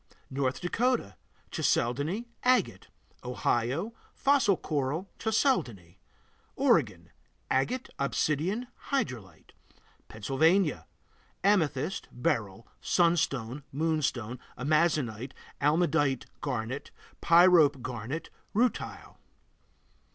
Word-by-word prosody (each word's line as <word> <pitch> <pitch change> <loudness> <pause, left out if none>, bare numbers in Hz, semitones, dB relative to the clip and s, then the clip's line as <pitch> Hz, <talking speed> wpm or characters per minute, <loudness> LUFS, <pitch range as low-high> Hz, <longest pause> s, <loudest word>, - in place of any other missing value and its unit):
North 130 -1 -1
Dakota 230 - 0 0.4
Chalcedony, 145 - 0 0.2
agate. 255 0 +2 0.4
Ohio 125 - -1 0.2
Fossil 270 -9 +3
coral, 150 +5 -2
chalcedony. 120 - 0 0.6
Oregon - - +1 0.4
Agate, 240 - 0
obsidian, 155 - 0 0.2
hydrolite. 125 - -3 0.6
Pennsylvania 150 - +1 0.6
Amethyst, 180 -5 +1
beryl, 115 - -2 0.2
sunstone, 150 -7 +1
moonstone, 140 -6 -1 0.2
amazonite, 140 -4 +1 0.3
almandite 145 -3 +2 0.2
garnet, 130 -1 -3 0.3
pyrope 170 -6 +6
garnet, 125 +5 -5 0.2
rutile. 245 +3 -1
150 Hz, 70 wpm, -29 LUFS, 125-180 Hz, 0.6 s, pyrope